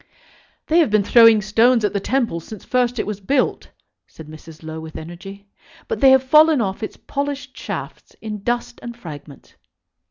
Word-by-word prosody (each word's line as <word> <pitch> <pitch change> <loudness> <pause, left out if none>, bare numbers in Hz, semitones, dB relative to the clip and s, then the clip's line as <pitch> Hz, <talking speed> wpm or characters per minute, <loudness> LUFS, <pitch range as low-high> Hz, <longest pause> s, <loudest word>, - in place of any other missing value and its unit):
"They 325 +2 +2
have 320 - +3
been 210 -1 +2
throwing 225 0 +6
stones 225 +2 +3
at - - -1
the 200 - 0
Temple 230 -5 -1
since 205 +5 -11
first 245 -1 0
it - - -2
was 210 -1 -5
built," 255 +7 -1 0.4
said 160 - -13
Mrs. 155 +1 -13
Low, 160 0 -7
with 160 -1 -9
energy; 195 +5 -10 0.4
"but 455 - -3
they 270 - +7
have 265 0 +5
fallen 305 +2 +5
off 195 -2 -3
its 215 - -6
polished 280 -1 -5
shafts - - -8
in 210 -2 -7
dust 240 +2 -3
and 235 0 -8
fragments." 145 - -12
220 Hz, 180 wpm, -20 LUFS, 190-255 Hz, 0.4 s, they